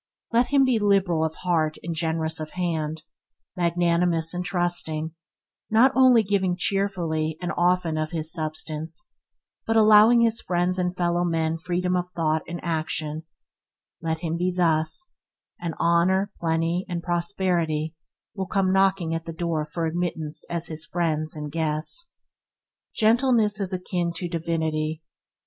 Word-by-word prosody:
Let 235 Hz, +2 st, +3 dB
him 275 Hz, -1 st, +4 dB
be 250 Hz, -4 st, +2 dB
liberal 195 Hz, -5 st, +2 dB
of 160 Hz, 0 st, -2 dB
heart 160 Hz, -4 st, 0 dB
and 170 Hz, -, -3 dB
generous 160 Hz, 0 st, -2 dB
of 155 Hz, 0 st, -6 dB
hand, 160 Hz, -3 st, -2 dB, 0.5 s
magnanimous 170 Hz, -1 st, +1 dB
and 180 Hz, 0 st, -2 dB
trusting, 175 Hz, -3 st, 0 dB, 0.6 s
not 230 Hz, +5 st, +5 dB
only 255 Hz, -3 st, +6 dB
giving 190 Hz, -3 st, +1 dB
cheerfully 175 Hz, -5 st, -1 dB
and 180 Hz, -, -3 dB
often 175 Hz, -2 st, +1 dB
of 155 Hz, 0 st, -1 dB
his 160 Hz, -1 st, -1 dB
substance, 155 Hz, -, -3 dB, 0.5 s
but 225 Hz, 0 st, +2 dB
allowing 215 Hz, +2 st, +7 dB
his 230 Hz, 0 st, +2 dB
friends 180 Hz, +1 st, 0 dB
and 180 Hz, 0 st, -1 dB
fellow 175 Hz, 0 st, +1 dB
men 165 Hz, -1 st, 0 dB
freedom 180 Hz, +2 st, -1 dB
of 180 Hz, 0 st, -1 dB
thought 160 Hz, -3 st, 0 dB
and 175 Hz, 0 st, -5 dB
action 160 Hz, -1 st, -3 dB, 0.3 s
– -, -, -64 dB
let 160 Hz, -1 st, -2 dB
him 165 Hz, -1 st, -2 dB
be 180 Hz, +1 st, 0 dB
thus, 170 Hz, -, 0 dB, 0.5 s
and 170 Hz, -2 st, -3 dB
honour, 185 Hz, +4 st, +2 dB
plenty, 165 Hz, +2 st, 0 dB
and 170 Hz, -1 st, -3 dB
prosperity 170 Hz, -3 st, -1 dB, 0.4 s
will 190 Hz, -2 st, -4 dB
come 195 Hz, -2 st, +1 dB
knocking 190 Hz, -3 st, +2 dB
at 165 Hz, 0 st, -3 dB
the 165 Hz, -, -5 dB
door 160 Hz, -2 st, -1 dB
for 165 Hz, +2 st, -3 dB
admittance 160 Hz, -2 st, -2 dB
as 170 Hz, -1 st, -1 dB
his 160 Hz, -2 st, -4 dB
friends 155 Hz, -2 st, -1 dB
and 150 Hz, -1 st, -6 dB
guests. 160 Hz, -, -2 dB, 0.8 s
Gentleness 225 Hz, -2 st, +3 dB
is 195 Hz, -2 st, -2 dB
akin 180 Hz, -2 st, -2 dB
to 175 Hz, +1 st, -4 dB
divinity. 160 Hz, -2 st, -2 dB
170 Hz, 145 wpm, -25 LUFS, 160-185 Hz, 0.8 s, allowing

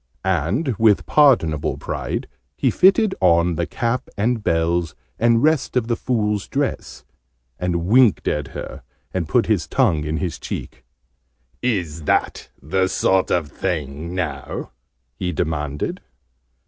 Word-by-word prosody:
And 95 Hz, -, 0 dB
with 110 Hz, -3 st, +4 dB
pardonable 115 Hz, -, +3 dB
pride -, -, -4 dB, 0.3 s
he 130 Hz, -, +2 dB
fitted 195 Hz, -, +4 dB
on 85 Hz, -1 st, +4 dB
the 85 Hz, +1 st, -2 dB
cap 125 Hz, +1 st, -2 dB
and 110 Hz, +2 st, 0 dB
bells, 85 Hz, -2 st, 0 dB, 0.2 s
and 115 Hz, +1 st, +4 dB
the -, -, +3 dB
rest 155 Hz, -3 st, +2 dB
of 115 Hz, -3 st, 0 dB
the 120 Hz, -, +1 dB
Fool's 105 Hz, -5 st, -1 dB
dress, 140 Hz, 0 st, -3 dB, 0.5 s
and 85 Hz, -1 st, -1 dB
winked 120 Hz, +2 st, +4 dB
at 75 Hz, -2 st, -1 dB
her, -, -, -8 dB, 0.3 s
and 85 Hz, -4 st, -2 dB
put 120 Hz, -, +3 dB
his 105 Hz, -6 st, 0 dB
tongue 95 Hz, -, +2 dB
in 75 Hz, +1 st, -2 dB
his 90 Hz, -1 st, -3 dB
cheek. -, -, -7 dB, 0.8 s
"Is 90 Hz, -10 st, -1 dB
that -, -, 0 dB
the 95 Hz, +6 st, 0 dB
sort 95 Hz, 0 st, +1 dB
of 80 Hz, -4 st, 0 dB
thing, 80 Hz, -2 st, -3 dB
now." 75 Hz, -7 st, -4 dB, 0.4 s
he 90 Hz, +8 st, -3 dB
demanded. 75 Hz, -3 st, -3 dB
95 Hz, 135 wpm, -21 LUFS, 80-115 Hz, 0.8 s, with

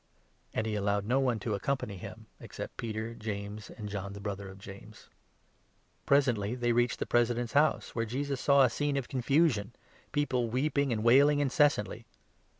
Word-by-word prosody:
And 110 Hz, -, -2 dB
he 110 Hz, -, -2 dB
allowed 100 Hz, -1 st, 0 dB
no 125 Hz, +5 st, +2 dB
one 125 Hz, -4 st, +1 dB
to 110 Hz, -, -2 dB
accompany 105 Hz, 0 st, -2 dB
him, -, -, -9 dB
except -, -, -8 dB
Peter, 110 Hz, 0 st, -4 dB
37 -, -, -14 dB
James, 105 Hz, 0 st, -5 dB
and 105 Hz, -2 st, -8 dB
John, 100 Hz, -1 st, -5 dB
the 100 Hz, -, -8 dB
brother 100 Hz, -1 st, -5 dB
of 95 Hz, -, -11 dB
James. 100 Hz, +2 st, -12 dB, 1.0 s
Presently 125 Hz, -6 st, +2 dB
they 120 Hz, -1 st, -1 dB
38 -, -, +2 dB
reached 120 Hz, +1 st, +2 dB
the -, -, -2 dB
President's 120 Hz, 0 st, +1 dB
house, 150 Hz, +1 st, +2 dB
where 115 Hz, -1 st, -1 dB
Jesus 135 Hz, +3 st, -3 dB
saw 140 Hz, -1 st, +5 dB
a 130 Hz, -, +4 dB
scene 145 Hz, +2 st, -1 dB
of 135 Hz, -, -3 dB
confusion 130 Hz, -4 st, +1 dB, 0.2 s
— -, -, -30 dB
people 130 Hz, -5 st, 0 dB
weeping 140 Hz, +2 st, 0 dB
and 110 Hz, -2 st, -1 dB
wailing 140 Hz, +5 st, +5 dB
incessantly. 145 Hz, -6 st, +1 dB
120 Hz, 180 wpm, -30 LUFS, 105-135 Hz, 1.0 s, saw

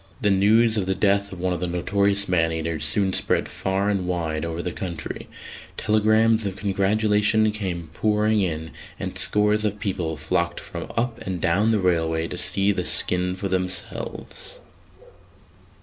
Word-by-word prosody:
The 105 Hz, -5 st, +2 dB
news 110 Hz, +4 st, +4 dB
of 95 Hz, -3 st, -1 dB
the 95 Hz, -, +1 dB
death 100 Hz, 0 st, +2 dB
of 95 Hz, -, -8 dB
one 90 Hz, 0 st, 0 dB
of 90 Hz, -, -3 dB
the 90 Hz, -, -1 dB
notorious 100 Hz, +3 st, 0 dB
man 80 Hz, -3 st, +2 dB
eaters 80 Hz, -1 st, -3 dB
soon 95 Hz, +5 st, 0 dB
spread -, -, +1 dB
far 95 Hz, +1 st, -1 dB
and 100 Hz, -3 st, 0 dB
wide 80 Hz, -3 st, -2 dB
over 85 Hz, +1 st, -3 dB
the 90 Hz, -, -2 dB
country: 85 Hz, -2 st, -6 dB, 0.5 s
telegrams 110 Hz, +1 st, +3 dB
of 95 Hz, -, -4 dB
congratulation 105 Hz, +2 st, +2 dB
came 90 Hz, -6 st, -4 dB
pouring 105 Hz, +2 st, +2 dB
in, 80 Hz, -3 st, -2 dB, 0.3 s
and -, -, -4 dB
scores 105 Hz, +1 st, +1 dB
of 105 Hz, -1 st, -1 dB
people 85 Hz, -6 st, -2 dB
flocked 85 Hz, +3 st, -1 dB
from -, -, -7 dB
up 120 Hz, 0 st, 0 dB
and 95 Hz, -2 st, -4 dB
down 95 Hz, +6 st, +2 dB
the 110 Hz, -, +3 dB
railway 80 Hz, -3 st, +1 dB
to 90 Hz, -, -5 dB
see 100 Hz, +2 st, +1 dB
the -, -, -1 dB
skin 90 Hz, 0 st, +1 dB
for 100 Hz, +1 st, -3 dB
themselves. 95 Hz, -, -5 dB
95 Hz, 165 wpm, -24 LUFS, 85-105 Hz, 0.5 s, news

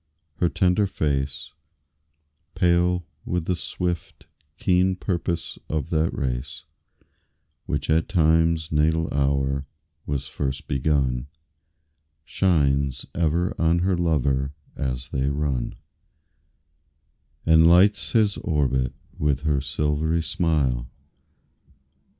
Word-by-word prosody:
Her 85 Hz, -, +2 dB
tender 95 Hz, +4 st, +2 dB
face, 70 Hz, -4 st, -2 dB, 1.0 s
Pale 90 Hz, 0 st, +2 dB, 0.2 s
with 90 Hz, -2 st, -2 dB
the 90 Hz, -, 0 dB
swift, 85 Hz, -1 st, -4 dB, 0.3 s
keen 95 Hz, 0 st, +2 dB
purpose 85 Hz, -3 st, -3 dB
of 75 Hz, -3 st, -2 dB
that 80 Hz, +1 st, +1 dB
race 65 Hz, +3 st, -4 dB, 1.0 s
Which 70 Hz, -1 st, -2 dB
at 80 Hz, +4 st, +2 dB
Time's 80 Hz, -2 st, +2 dB
natal 80 Hz, +2 st, +2 dB
hour 70 Hz, 0 st, 0 dB, 0.4 s
was 70 Hz, -1 st, -2 dB
first 70 Hz, 0 st, -4 dB
begun, 65 Hz, -2 st, 0 dB, 1.0 s
Shines 70 Hz, -7 st, +1 dB
ever 85 Hz, +2 st, +1 dB
on 80 Hz, +1 st, +3 dB
her 95 Hz, -1 st, +2 dB
lover 70 Hz, -5 st, 0 dB, 0.2 s
as 65 Hz, 0 st, -3 dB
they 65 Hz, 0 st, 0 dB
run 70 Hz, -4 st, -2 dB, 1.7 s
And 80 Hz, 0 st, +6 dB
lights 95 Hz, +5 st, +4 dB
his 110 Hz, -4 st, +3 dB
orbit 65 Hz, -6 st, 0 dB, 0.2 s
with 70 Hz, -3 st, +1 dB
her 75 Hz, -3 st, +1 dB
silvery 75 Hz, +3 st, 0 dB
smile. 70 Hz, -9 st, 0 dB
75 Hz, 95 wpm, -24 LUFS, 70-85 Hz, 1.7 s, And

